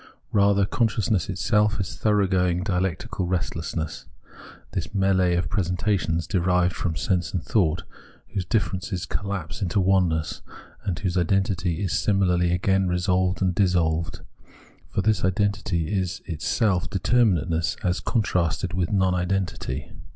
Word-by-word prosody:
Kather 100 -1 +4
consciousness 110 -6 0
itself 105 +3 +1
is 95 - -3
thoroughgoing 95 -4 +2
dialectical 95 +1 -2
restlessness, 80 -4 -3 0.6
this 85 -4 -2
m^lee 95 -2 +2
of 90 - 0
presentations 90 -3 0
derived 90 0 +1
from 85 -3 -2
sense 90 +2 -1
and 85 - -1
thought, 85 -5 +1 0.5
whose 100 -3 -1
differences 95 -2 -1
collapse 95 -5 -4
into 95 +1 +1
oneness, 90 -5 +1 0.4
and 95 -5 -2
whose 95 -1 -1
identity 95 -1 0
is 95 - -1
similarly 90 -4 +2
again 95 +2 +2
resolved 90 +1 +1
and 90 -1 +2
dissolved 85 -4 +1 0.4
— - - -26
for 100 - 0
this 105 -2 +2
identity 95 -2 0
is 95 -1 -2
itself 90 +3 0
determinateness 90 -6 +1
as 90 0 +1
contrasted 90 -6 0
with 90 -2 -1
non 95 -2 +2
identity. 90 -7 -2
95 Hz, 125 wpm, -24 LUFS, 85-100 Hz, 0.6 s, Kather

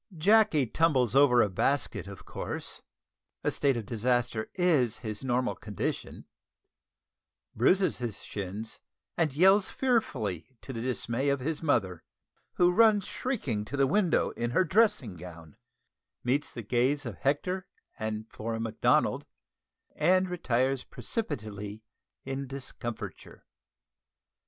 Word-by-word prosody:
Jacky 205 -4 +4
tumbles 130 -2 +2
over 130 -4 +6
a - - +2
basket, 135 +5 0
of 100 -1 -10
course, - - -4 0.6
(a - - +1
state 135 -3 +1
of 115 - -4
disaster 120 0 0
is 150 - +2
his 110 0 -5
normal 125 -1 0
condition), 105 -3 -5 1.3
bruises 185 - +3
his 120 -4 -4
shins, 105 +3 -6 0.3
and 160 -3 +1
yells 190 +7 +5
fearfully, 130 - -1
to 135 - -7
the 115 - -4
dismay 125 +2 -1
of 140 0 +1
his 150 +4 -3
mother, 100 - 0 0.5
who 175 0 +4
runs 210 -1 +5
shrieking 145 - -2
to 140 +7 -6
the 135 - +4
window 180 +4 +2
in 120 0 -3
her 155 +10 +3
dressing 170 - +2
gown, 85 -3 -11 0.7
meets 135 +4 0
the 115 - -7
gaze 130 +6 +1
of 115 -5 -6
Hector 180 +7 -1 0.3
and 110 0 -3
Flora 115 +1 -4
Macdonald, 115 -1 +1 0.7
and 185 +1 +3
retires 130 -5 0
precipitately 105 - -5 0.4
in 135 +1 -4
discomfiture. 130 -3 -7
130 Hz, 125 wpm, -29 LUFS, 110-165 Hz, 1.3 s, over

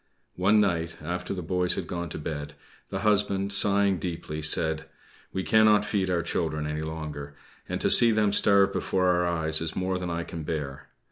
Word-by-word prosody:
One 100 +4 +3
night 85 -5 -1
after 90 +3 -5
the 90 -3 -4
boys 90 +1 +1
had 95 - -4
gone 85 0 -5
to - - -7
bed 75 -1 -6 0.3
the 95 - -4
husband 100 -2 +1
sighing 100 -1 +3
deeply, 80 -3 -5
said 80 +1 +2 0.5
"We 95 - -3
cannot 105 -1 +4
feed 100 -3 -1
our 85 -2 0
children 80 -3 -2
any 75 +1 -3
longer, 75 -2 -7 0.3
and - - -3
to - - +3
see 120 - +7
them 105 -2 +1
starve 100 -1 +4
before 90 -1 0
our 90 0 +2
eyes 80 -2 0
is 80 -1 -2
more 95 0 -2
than 90 -1 -4
I 85 0 -3
can 85 -1 -7
bear. 75 -3 -5
90 Hz, 190 wpm, -26 LUFS, 80-100 Hz, 0.5 s, see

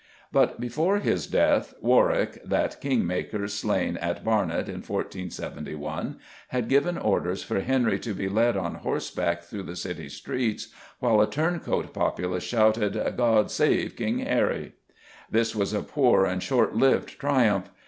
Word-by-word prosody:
But - - +2
before 155 - +1
his 205 - 0
death, - - +2
Warwick - - +2
that - - -1
king 135 -7 +1
maker 100 +4 -2
slain 100 -4 -1
at 85 +1 -3
Barnet 105 -7 +1
in - - -6
1471 75 -5 -5 0.3
had 125 -3 -2
given 140 +7 +2
orders 95 -3 0
for - - -1
Henry 125 +2 +1
to 110 -4 -4
be 95 - -2
led 115 +5 +2
on - - -2
horseback 85 0 -2
through 100 +4 -7
the 90 -2 -7
city - - -5
streets 120 -4 -3 0.3
"while 115 -4 +3
a 105 - +3
turncoat 165 +3 -1
populace 90 0 -1
shouted 110 -3 +2 0.2
'God 115 -3 +3
save - - +1
King - - -1
Harry!'" - - 0 0.6
This 115 0 +1
was 100 -1 0
a 105 - -1
poor 125 -9 +3
and 95 -1 -1
short 130 +2 +2
lived 135 0 +2
triumph. 125 -10 +2
110 Hz, 150 wpm, -26 LUFS, 95-130 Hz, 0.6 s, while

